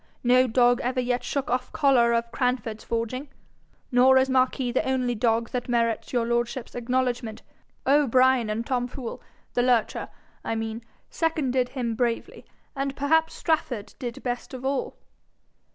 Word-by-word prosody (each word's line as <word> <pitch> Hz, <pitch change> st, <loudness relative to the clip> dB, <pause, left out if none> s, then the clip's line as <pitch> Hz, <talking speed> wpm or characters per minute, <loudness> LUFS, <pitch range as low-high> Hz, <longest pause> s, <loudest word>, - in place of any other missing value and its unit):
No 255 Hz, +1 st, +5 dB
dog 245 Hz, +1 st, +3 dB
ever 255 Hz, +1 st, -1 dB
yet 245 Hz, 0 st, 0 dB
shook 275 Hz, -1 st, -2 dB
off 250 Hz, +1 st, -1 dB
collar 270 Hz, -7 st, +4 dB
of 235 Hz, 0 st, 0 dB
Cranford's 250 Hz, -4 st, -1 dB
forging; 235 Hz, +5 st, -3 dB, 0.6 s
nor 255 Hz, +1 st, +6 dB
is 260 Hz, 0 st, +3 dB
Marquis 255 Hz, -1 st, +2 dB
the 250 Hz, -, +1 dB
only 255 Hz, -2 st, 0 dB
dog 230 Hz, 0 st, +1 dB
that 250 Hz, 0 st, -3 dB
merits 230 Hz, -2 st, 0 dB
your 240 Hz, -2 st, +1 dB
lordship's 235 Hz, +1 st, -2 dB
acknowledgment: 245 Hz, -2 st, -2 dB, 0.4 s
O'Brien 260 Hz, -4 st, +4 dB
and 220 Hz, +2 st, -2 dB
Tom 245 Hz, -1 st, -1 dB
Fool 250 Hz, -2 st, -7 dB, 0.3 s
the 245 Hz, -, +2 dB
lurcher, 245 Hz, -3 st, +1 dB, 0.3 s
I 225 Hz, -, -2 dB
mean 225 Hz, +1 st, -4 dB, 0.3 s
seconded 265 Hz, -6 st, 0 dB
him 245 Hz, -4 st, -2 dB
bravely, 230 Hz, 0 st, -2 dB, 0.3 s
and 275 Hz, 0 st, -2 dB
perhaps 320 Hz, +3 st, +2 dB
Strafford 250 Hz, -10 st, -1 dB
did 240 Hz, -2 st, -6 dB
best 245 Hz, +1 st, -4 dB
of 255 Hz, +1 st, -8 dB
all.' 270 Hz, 0 st, -2 dB
250 Hz, 150 wpm, -25 LUFS, 235-260 Hz, 0.6 s, nor